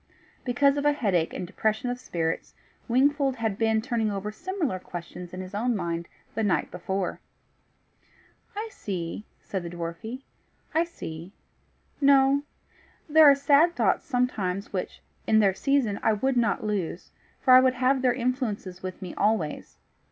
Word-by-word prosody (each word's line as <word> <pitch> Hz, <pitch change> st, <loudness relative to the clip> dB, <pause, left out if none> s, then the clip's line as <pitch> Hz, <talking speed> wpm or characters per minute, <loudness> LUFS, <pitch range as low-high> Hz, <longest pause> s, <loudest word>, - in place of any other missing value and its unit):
Because 275 Hz, +3 st, +3 dB
of 285 Hz, -, -1 dB
a 295 Hz, -, +5 dB
headache 190 Hz, -, +1 dB
and 180 Hz, -, -4 dB
depression 220 Hz, +6 st, -1 dB
of 245 Hz, -, -5 dB
spirits, 165 Hz, -8 st, -3 dB, 0.3 s
Wingfold 275 Hz, +2 st, +2 dB
had 225 Hz, -4 st, -1 dB
been 220 Hz, -1 st, +2 dB
turning 235 Hz, -3 st, 0 dB
over 205 Hz, +1 st, -3 dB
similar 335 Hz, -, -3 dB
questions 175 Hz, 0 st, -8 dB
in 185 Hz, -, -6 dB
his 185 Hz, +1 st, -9 dB
own 235 Hz, +4 st, 0 dB
mind 170 Hz, -3 st, -3 dB, 0.3 s
the 225 Hz, -, -2 dB
night 205 Hz, -4 st, +1 dB
before. 190 Hz, +1 st, -3 dB, 1.4 s
"I 430 Hz, +2 st, -3 dB
see," 185 Hz, -, -5 dB, 0.2 s
said 190 Hz, -, -3 dB
the 170 Hz, -, -6 dB
dwarfie 175 Hz, +10 st, -6 dB, 0.5 s
"I 325 Hz, +2 st, +3 dB
see. 170 Hz, -, -8 dB, 0.7 s
No. 275 Hz, 0 st, +5 dB, 0.7 s
There 310 Hz, -1 st, +8 dB
are 280 Hz, -, +7 dB
sad 285 Hz, +5 st, +4 dB
thoughts -, -, +2 dB
sometimes 220 Hz, -7 st, -1 dB
which -, -, -4 dB, 0.3 s
in 220 Hz, -, +4 dB
their 200 Hz, -3 st, +4 dB
season 250 Hz, -2 st, +1 dB
I 220 Hz, -, +3 dB
would 265 Hz, +6 st, 0 dB
not 230 Hz, -4 st, +1 dB
lose, 195 Hz, -4 st, -3 dB, 0.3 s
for 255 Hz, -, +5 dB
I 255 Hz, -, +11 dB
would 255 Hz, 0 st, +3 dB
have 255 Hz, +1 st, +2 dB
their 255 Hz, -1 st, +4 dB
influences 235 Hz, -7 st, -2 dB
with 185 Hz, +1 st, -6 dB
me 180 Hz, -, -6 dB
always. 205 Hz, -8 st, -1 dB
220 Hz, 155 wpm, -26 LUFS, 185-265 Hz, 1.4 s, I